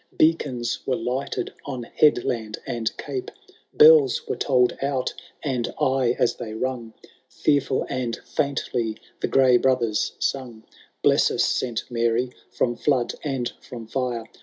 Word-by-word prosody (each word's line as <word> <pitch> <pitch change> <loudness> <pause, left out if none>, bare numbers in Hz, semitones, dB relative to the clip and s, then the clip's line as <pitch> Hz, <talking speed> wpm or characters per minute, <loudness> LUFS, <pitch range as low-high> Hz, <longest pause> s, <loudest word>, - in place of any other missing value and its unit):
Beacons 140 -7 +1
were 130 - +2
lighted 125 +4 -3
on 130 -4 -5
headland 115 -5 +1
and 115 -2 -2
cape, 135 -3 -5 0.4
Bells 150 -5 +6
were - - -1
tolled 125 -3 +2
out, 135 -2 -1 0.3
and 130 -5 -1
aye 130 -2 +2
as 120 - +1
they 110 -2 -6
rung, 120 -2 -4 0.3
Fearfhl 140 -3 +1
and 120 -3 -2 0.2
&intly 120 -5 -1 0.2
the - - -1
gray 130 -2 +5
brothers 120 -4 +1
sung, 120 -5 -3 0.2
*' - - -34
Bless - - +4
us, - - +1
St. 120 -3 -1
Mary, 120 +1 +1 0.2
from 120 -1 0
flood 130 -4 +1
and 135 -5 -1
from 120 -3 -9
fire. 120 -1 -2
125 Hz, 135 wpm, -24 LUFS, 120-135 Hz, 0.4 s, Bells